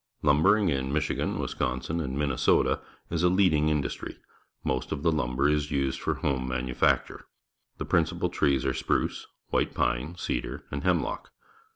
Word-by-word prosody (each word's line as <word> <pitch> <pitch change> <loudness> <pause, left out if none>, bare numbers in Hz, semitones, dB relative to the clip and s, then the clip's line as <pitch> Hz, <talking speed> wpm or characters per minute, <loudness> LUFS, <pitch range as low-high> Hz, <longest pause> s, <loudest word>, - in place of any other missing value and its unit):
Lumbering 90 +8 +4
in 65 -2 -1
INIichigan, 75 0 -1
Wisconsin, 65 +6 -2
and 70 -4 -3
Minnesota 70 -3 +2 0.3
is 85 -1 0
a 90 - +4
leading 90 -5 +3
industry. 75 -5 -2 0.5
jMost 65 -1 -1
of 70 - -3
the 85 - +4
lumber 70 -2 +1
is 75 0 +1
used 70 -2 -1
for - - 0
home 65 -2 -1
manufacture. 65 0 0 0.5
The - - -4
principal - - +1
trees 70 -3 +1
are 65 - +1
spruce, 65 - -1 0.2
white - - 0
pine, 65 +8 0
_cedar, 75 -8 -3
and 70 +2 -4
hemlock. 90 -5 0
70 Hz, 150 wpm, -28 LUFS, 65-80 Hz, 0.5 s, Lumbering